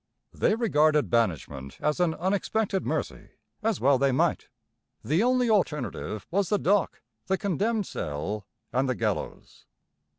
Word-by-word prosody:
They - - +2
regarded 155 -9 +2
banishment 75 - -1
as 150 +3 0
an 170 -3 +2
unexpected 195 +2 -1
mercy, - - -3 0.3
as 220 -3 0
well 135 0 +4
they 135 0 +3
might. 130 - +1 0.6
The 155 - +2
only 250 +1 +3
alternative 150 - -1
was 195 +1 +1
the 210 - +3
dock, 200 +1 +1 0.2
the 190 - +1
condemned 205 +3 0
cell, 90 - -4 0.3
and 130 +1 +1
the 130 - 0
gallows. 110 -4 -4
155 Hz, 135 wpm, -27 LUFS, -, 0.6 s, well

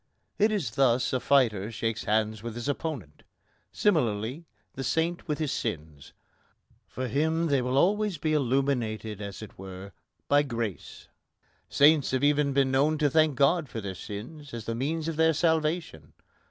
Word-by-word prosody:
It 215 +2 +4
is 205 -9 -1
thus 125 -2 +2
a 130 - +1
fighter 115 -7 +2
shakes 115 0 -3
hands 110 0 0
with 115 0 -6
his 120 +2 -5
opponent. 145 - -4 0.5
Similarly, 130 - 0 0.3
the 135 - -5
saint 165 +7 -1
with 150 -2 -1
his 155 -3 -2
sins. 80 - -5 0.7
For 130 0 -4
him 160 +6 +1
they 140 -2 +2
will 125 +2 -1
always 205 +3 +2
be 155 +1 -1
illuminated, 120 -6 0
as 100 +1 -7
it 105 - -12
were, 95 +1 -9 0.4
by 145 0 +5
grace. 115 - -5 0.6
Saints 145 -1 +5
have 130 +1 -1
even 145 0 +3
been 135 -1 +2
known 145 +4 +2
to 150 -2 +1
thank 155 -1 +3
God 145 +3 +2
for 115 - -5
their 100 -3 -5
sins 120 - -8
as 115 -2 -7
the 115 - -2
means 150 +7 -2
of 165 -2 -3
their 160 0 +4
salvation. 160 - -1
135 Hz, 165 wpm, -27 LUFS, 110-155 Hz, 0.7 s, by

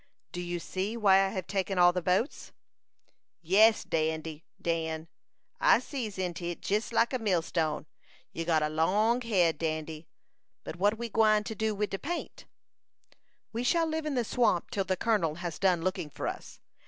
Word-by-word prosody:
"Do 175 - -5
you 175 0 -3
see 195 +6 -3
why 195 -3 +5
I - - +1
have 190 -2 -4
taken 195 -1 -2
all 175 0 +6
the 180 - -1
boats?" 185 - -1 0.9
"Yes, 210 +6 +4
Dandy 160 0 -2 0.2
Dan; 160 -1 -2 0.5
I - - +6
sees 230 -9 -5
into 180 -2 -3
it 175 0 -5
jes 210 +4 0
like 230 +2 +2
a 255 - 0
millstone. 170 -7 0 0.5
You'se 165 0 -4
got 160 -2 +3
a 150 - 0
long 210 +10 +2
head, 180 -10 +2
Dan. 155 -1 -1 0.8
But 165 - -7
what 205 +4 +1
ye 235 - -3
gwine 215 -1 +3
to 220 - -5
do 220 -1 -1
wid 210 +1 -2
de 195 - -3
paint?" 340 +4 -5 1.1
"We 235 +2 -2
shall 330 +6 +2
live 320 -1 -2
in 290 - -2
the 245 - +1
swamp 220 -6 +1
till 195 -2 -1
the 185 -1 -1
colonel 185 -8 +1
has 170 -1 -5
done 180 -4 +2
looking 185 -4 -2
for - - -5
us. - - -7
190 Hz, 180 wpm, -29 LUFS, 165-220 Hz, 1.1 s, all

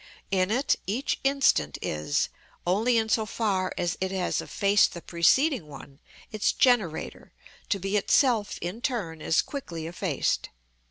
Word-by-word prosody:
In 185 -1 +2
it 255 +6 +1
each 235 +8 -1
instant 270 - +2
is, 75 -1 -1 0.4
only 220 +7 +2
in 220 -1 +1
so 220 0 +1
far 200 -5 -1
as 175 -1 -2
it 190 - 0
has 190 -1 -1
effaced 200 +1 +2
the 170 - -7
preceding 230 - +2
one, 140 -1 -12 0.3
its 215 -1 +1
generator, 215 -11 +1 0.4
to 205 - +1
be 195 +2 -3
itself 220 0 +2
in 180 +7 -5
turn 210 - -3
as 160 - +2
quickly 170 - -6
effaced. 165 +1 -1
200 Hz, 145 wpm, -27 LUFS, 170-235 Hz, 0.4 s, In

